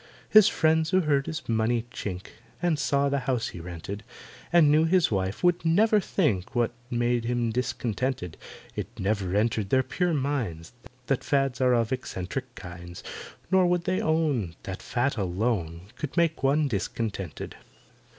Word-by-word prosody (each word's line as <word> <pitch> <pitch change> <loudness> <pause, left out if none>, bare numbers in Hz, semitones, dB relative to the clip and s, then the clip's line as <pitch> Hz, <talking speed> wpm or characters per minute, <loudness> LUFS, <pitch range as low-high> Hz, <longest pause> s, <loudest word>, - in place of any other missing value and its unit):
His 215 -2 +8
friends, 160 0 +2
who 185 +1 +3
heard 145 -4 +1
his 160 +1 -5
money 115 +1 +1
chink, 95 -5 -5 0.3
And 170 -3 +1
saw 140 -1 +2
the 140 0 +1
house 125 -3 0
he - - -9
rented, 90 +4 -7 0.5
And 165 -4 +6
knew 155 +2 +5
his 175 -2 +3
wife, 95 -1 -1
could 175 -1 +3
never 210 +6 +4
think 130 - 0
What 120 -1 +2 0.2
made 120 -1 +1
him 120 -1 0
discontented. 120 -5 -2 0.4
It - - -3
never 95 -2 0
entered 110 -1 +1
their 130 +3 +3
pure 180 +1 0
minds 120 - -2 0.3
That 135 0 0
fads 135 -2 +1
are 125 -1 +4
of 115 -2 +1
eccentric 125 +1 -4
kinds, 85 -1 -9 0.5
Nor 190 -1 +5
would 175 -1 +1
they 185 +1 0
own 145 - 0
That 95 -1 -6
fat 125 +1 -1
alone 90 -3 -1 0.2
Could 150 +2 -5
make 165 -2 +2
one 145 +3 +3
discontented. 105 -3 -4
125 Hz, 155 wpm, -27 LUFS, 100-155 Hz, 0.5 s, His